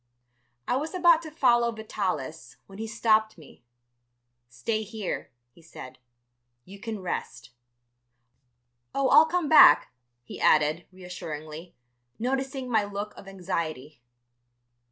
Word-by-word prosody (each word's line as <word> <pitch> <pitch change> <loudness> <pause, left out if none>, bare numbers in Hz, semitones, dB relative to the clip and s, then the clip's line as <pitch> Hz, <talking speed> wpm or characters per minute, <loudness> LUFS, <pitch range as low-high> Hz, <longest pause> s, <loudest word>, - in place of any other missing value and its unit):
I 250 - +1
was 310 +6 -4
about 345 -2 +5
to 320 - -9
follow 240 -6 +2
Vitalis, 190 - -5
when 195 +1 -14
he 225 - -4
stopped 220 -2 +1
me. 150 -6 -17 0.9
"Stay 125 - -3
here," 215 -2 -5 0.2
he 170 - -21
said; 130 -6 -12 0.7
"you 200 +2 -13
can 220 -2 -6
rest. 120 -8 -5 1.4
"Oh, 275 -1 +1
I'll 320 - +7
come 345 -1 -1
back," 310 - +7 0.3
he - - -10
added, 155 +3 +2
reassuringly, 165 -3 -9 0.4
noticing 265 +2 -3
my 220 -4 +2
look 205 +1 -6
of 195 - -13
anxiety. 160 -8 -5
205 Hz, 115 wpm, -26 LUFS, 165-245 Hz, 1.4 s, I'll